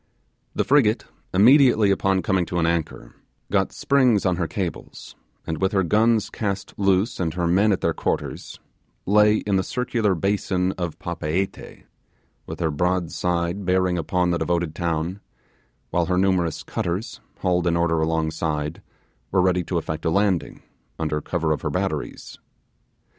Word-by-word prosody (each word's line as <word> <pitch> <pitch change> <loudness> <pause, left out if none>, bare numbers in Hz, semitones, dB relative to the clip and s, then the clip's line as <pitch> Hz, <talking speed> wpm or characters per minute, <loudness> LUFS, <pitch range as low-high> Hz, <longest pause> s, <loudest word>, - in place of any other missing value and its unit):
The - - +1
frigate, - - +3 0.3
immediately 115 0 +5
upon 95 -1 +1
coming 95 0 +1
to 90 - -3
an 85 - +2
anchor, 80 -7 -2 0.4
got 95 -1 +1
springs 130 -7 +2
on 90 -2 +1
her 85 -2 -1
cables, 90 0 -6 0.3
and 80 +1 -4
with 95 +2 +1
her 95 -1 +3
guns 110 +4 +2
cast 100 -3 -3
loose 100 +3 +1
and 80 -3 -1
her 90 -1 -1
men 95 +5 +3
at 95 - 0
their - - +1
quarters, - - -4 0.5
lay 105 +2 +5
in 100 -2 0
the 95 - +1
circular 115 -5 0
basin 95 0 0
of 85 -4 -5
Papeete, 85 +3 -4 0.6
with - - -7
her 80 -2 +1
broadside 90 +2 -1
bearing 90 -1 +1
upon 90 +2 0
the 85 - 0
devoted 85 -2 -1
town; 85 +3 -2 0.7
while 85 -1 +1
her 90 -1 +1
numerous 90 -4 +1
cutters, 90 +6 -4 0.2
hauled 90 -1 +1
in 85 0 +2
order 85 -1 +1
alongside, 80 -1 -2 0.5
were 95 - +1
ready 90 0 +2
to 90 - -2
effect 80 -1 -4
a 80 - +1
landing, 95 0 0 0.3
under 75 -1 -2
cover 80 0 -1
of 75 - -1
her - - -2
batteries. - - -4
90 Hz, 155 wpm, -23 LUFS, 85-100 Hz, 0.7 s, immediately